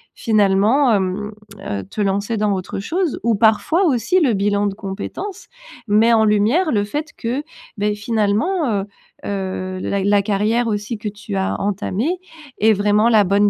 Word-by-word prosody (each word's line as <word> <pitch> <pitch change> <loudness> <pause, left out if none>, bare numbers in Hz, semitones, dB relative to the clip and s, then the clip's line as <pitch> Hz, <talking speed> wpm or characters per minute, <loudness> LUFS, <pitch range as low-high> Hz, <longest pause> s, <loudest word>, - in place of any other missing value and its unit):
finalement, 215 +4 +3
hem, 200 +1 -1 0.4
heu, 100 -1 -3
te 210 - -5
lancer 200 +3 0
dans 210 -1 +1
autre 185 0 -4
chose. 330 - -2
Ou 230 -1 +2
parfois 220 - +3
aussi 270 - +2
le 265 -7 +3
bilan 205 0 +1
de 200 - -2
compétences, 220 - -6 0.4
met 220 +3 +4
en 220 -1 +4
lumière 220 - +2
le 205 -3 +1
fait 295 +9 -4
que 250 +5 -2 0.3
beh 210 0 0
finalement, 225 - 0
heu - - -6 0.4
heu, 185 -1 -4
la 200 +1 -1
la 205 0 +3
carrière 215 +4 +1
aussi 210 +1 -2
que 210 0 -4
tu 205 0 -7
as 190 - -1
entamée 205 - -1 0.4
est 220 +2 +5
vraiment 210 +2 +3
la 220 -3 +5
bonne 200 +2 +3
210 Hz, 165 wpm, -19 LUFS, 200-235 Hz, 0.4 s, est